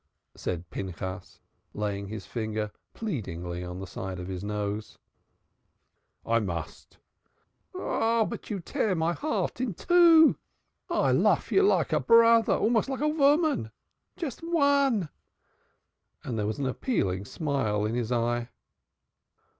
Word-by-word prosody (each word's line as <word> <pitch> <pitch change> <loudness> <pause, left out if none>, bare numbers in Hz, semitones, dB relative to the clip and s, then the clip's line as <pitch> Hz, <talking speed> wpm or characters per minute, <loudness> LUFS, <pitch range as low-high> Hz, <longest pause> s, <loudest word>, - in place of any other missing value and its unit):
said 90 -1 -4
Pinchas, 95 +1 -6 0.4
laying 100 -1 -3
his 110 +2 -7
finger 110 -2 -3 0.2
pleadingly 90 - -4
on 90 +1 -6
the 95 - -5
side 95 +1 -6
of 90 - -6
his 95 0 -5
nose. 105 +1 -4 1.3
"I 115 0 +2
must." 85 -7 -6 0.8
"You 225 -2 -1
tear 205 -4 0
my 165 +1 +1
heart 300 - -2
in 235 -8 -2
two. 335 - +6 0.5
I - - +2
lof - - +2
you 390 - +5
like 400 - +2
a - - +3
brother 230 -1 +5
almost 230 +2 +1
like 265 0 -3
a 300 0 +1
voman. 295 - +3 0.5
Just 325 -7 -5
von!" 280 - +2 1.2
There 110 -4 -2
was 110 - -3
an 140 - -2
appealing 100 - -1
smile 115 -8 -1
in 110 - -2
his 120 -1 -2
eye. 120 0 0
120 Hz, 120 wpm, -28 LUFS, -, 1.3 s, two